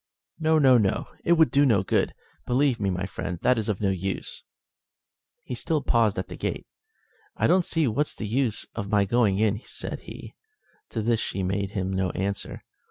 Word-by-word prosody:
"No, 160 0 +3
no, 130 -5 +6
no; 100 -3 0 0.2
it 170 - +4
would 160 -7 +4
do 140 +2 +4
no 110 -9 +3
good. - - 0 0.3
Believe 130 -1 +2
me, 100 - 0
my 90 0 -2
friend, 90 -2 -5
that 125 - +4
it - - +1
is 110 - -2
of 105 - -1
no 100 -2 +2
use." 95 +1 -3 1.0
He - - -6
still 150 +5 -1
paused 115 -3 +2
at - - -3
the - - -8
gate. - - -3 0.7
"I - - +1
don't 180 +1 +4
see 160 -3 +1
what's 140 +6 -1
the - - -5
use 120 +1 0
of 100 -3 -5
my 105 -1 +3
going 105 -2 +2
in," 105 0 +1
said - - -6
he. - - -10 0.6
To 110 - -3
this 115 0 +2
she 95 - -3
made 100 +2 -2
him 95 -2 -2
no 95 0 0
answer. 100 +1 -3
110 Hz, 200 wpm, -26 LUFS, 95-130 Hz, 1.0 s, no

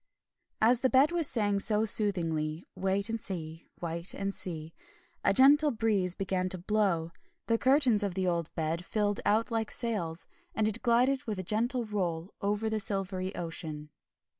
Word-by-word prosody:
As 230 +2 +5
the 260 - +2
Bed 270 +5 +4
was 335 -4 +1
saying 205 -4 +1
so 210 +2 +1
soothingly, 165 -7 -1
"Wait 195 +2 0
and 225 0 -2
see, 165 -5 -6
wait 170 +1 +2
and 195 0 -3
see," 160 -4 -5 0.5
a - - +4
gentle 290 +3 +6
breeze 210 -7 0
began 185 -1 -1
to 185 - -3
blow, 180 -4 0 0.3
the 230 0 +1
curtains 260 -5 +4
of 200 -3 -2
the 190 -1 -1
old 170 -3 -1
bed 165 +2 -2
filled 205 +1 -1
out 220 +3 +2
like 225 -1 -1
sails, 185 -9 -3 0.3
and 215 -1 +1
it 220 +2 -3
glided 255 +4 +2
with 215 -3 -3
a 185 - -4
gentle 235 +6 0
roll 180 -4 -3
over 210 +2 -1
the 220 0 -1
silvery 195 -2 0
ocean. 160 -3 -5
200 Hz, 165 wpm, -30 LUFS, 175-225 Hz, 0.5 s, gentle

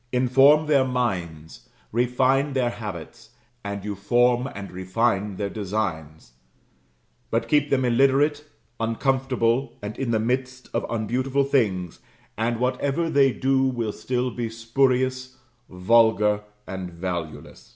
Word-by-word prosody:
Inform 135 +5 +5
their 145 -3 +3
minds, 90 -12 -3 0.2
refine 130 +4 +1
their 125 -3 +1
habits, 105 -3 -8 0.3
and 100 0 -5
you 105 - -3
form 120 +5 +2
and 100 0 -7
refine 95 +2 -1
their 100 +2 -2
designs; 90 - -4 1.0
but - - -1
keep 150 -1 +2
them 130 -2 +2
illiterate, 135 +4 +3 0.4
uncomfortable, 125 +1 0
and 105 +1 -6
in 135 -3 -2
the 110 -1 +1
midst 125 +2 -2
of - - -2
unbeautiful 130 +5 0
things, 105 - 0 0.4
and 115 +1 -1
whatever 140 +6 0
they 135 -1 +4
do 135 +1 +1
will 120 -5 -1
still 125 0 -2
be 120 -1 -4
spurious, 130 +2 0 0.3
vulgar, 105 +2 +3 0.2
and 95 -1 -6
valueless. 85 -7 -6
120 Hz, 120 wpm, -24 LUFS, 105-130 Hz, 1.0 s, Inform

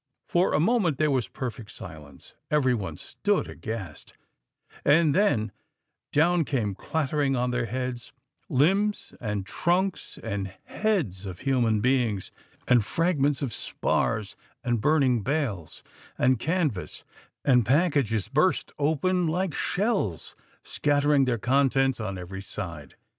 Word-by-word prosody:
For 175 -1 +2
a - - +3
moment 180 - +2
there 155 0 +2
was 130 -6 +1
perfect 115 +1 -6
silence; 75 -3 -11 0.2
every 140 -4 +3
one 95 -9 -4
stood - - -1
aghast, 105 -9 -7 0.7
and 150 +1 +4
then 120 - +2 0.6
down 170 +3 +3
came 120 -9 -1
clattering 145 - -1
on 125 0 0
their 125 -1 -1
heads, 125 +1 -4 0.4
limbs, 195 +10 +1
and 105 -4 -2
trunks, 180 - -1
and 100 -4 -4
heads 150 - -1
of 90 -2 -7
human 120 -6 +2
beings, 120 -6 +1 0.4
and 120 -3 +5
fragments 145 - +1
of 125 -5 -2
spars, 105 -2 -1 0.3
and 120 -3 0
burning 135 -4 +3
bales, 120 - -2 0.3
and 130 -1 +3
canvas, 155 - -1 0.4
and 125 -4 +5
packages 135 - +2
burst 155 +7 +1
open 165 +5 +1
like 180 +1 -1
shells, 190 - -1 0.3
scattering 145 -1 +2
their 125 -2 +1
contents 135 +2 +2
on 100 -3 -3
every 95 +2 -7
side. 85 -6 -7
130 Hz, 125 wpm, -26 LUFS, 110-155 Hz, 0.7 s, and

